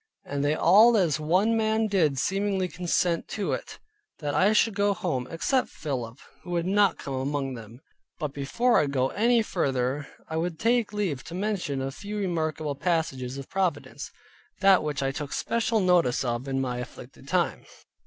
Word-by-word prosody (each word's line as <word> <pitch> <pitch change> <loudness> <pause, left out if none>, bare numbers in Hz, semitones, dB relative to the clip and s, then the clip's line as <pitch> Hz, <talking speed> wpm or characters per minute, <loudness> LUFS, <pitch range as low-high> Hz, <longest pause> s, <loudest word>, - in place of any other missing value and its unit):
And 140 0 -2
they 145 +1 +2
all 215 +9 +6
as 165 -7 +2
one 185 +9 +2
man 220 0 +1
did 170 -10 +2
seemingly 195 +3 0
consent 175 -1 0
to 205 - -3
it, - - -5 0.4
that 145 -2 -3
I 195 +3 +4
should 220 0 +3
go 200 0 +1
home; 135 -11 -2
except 255 +10 0
Philip, 125 -6 -5 0.2
who 175 - -12
would 170 -1 -1
not 200 +1 +3
come 140 - -6
among 135 0 -2
them. 115 +1 -11 0.4
But 150 -4 -4
before 235 - +2
I 150 - +2
go 135 -1 0
any 235 +1 +3
further, 135 -6 -1 0.2
I 160 - -3
would 165 0 -2
take 230 +1 +1
leave 195 -11 -2
to 170 - -7
mention 185 -9 -2
a 135 - -3
few 205 +9 -6
remarkable 160 -6 -1
passages 140 -5 -1
of 135 - -7
providence, 180 -6 -2 0.5
which 155 -8 +4
I 135 - 0
took 145 0 -5
special 225 -1 0
notice 175 -10 +2
of 120 +2 -2
in 135 0 -1
my 125 -2 -2
afflicted 125 - -10
time. - - 0
165 Hz, 175 wpm, -27 LUFS, 140-200 Hz, 0.5 s, all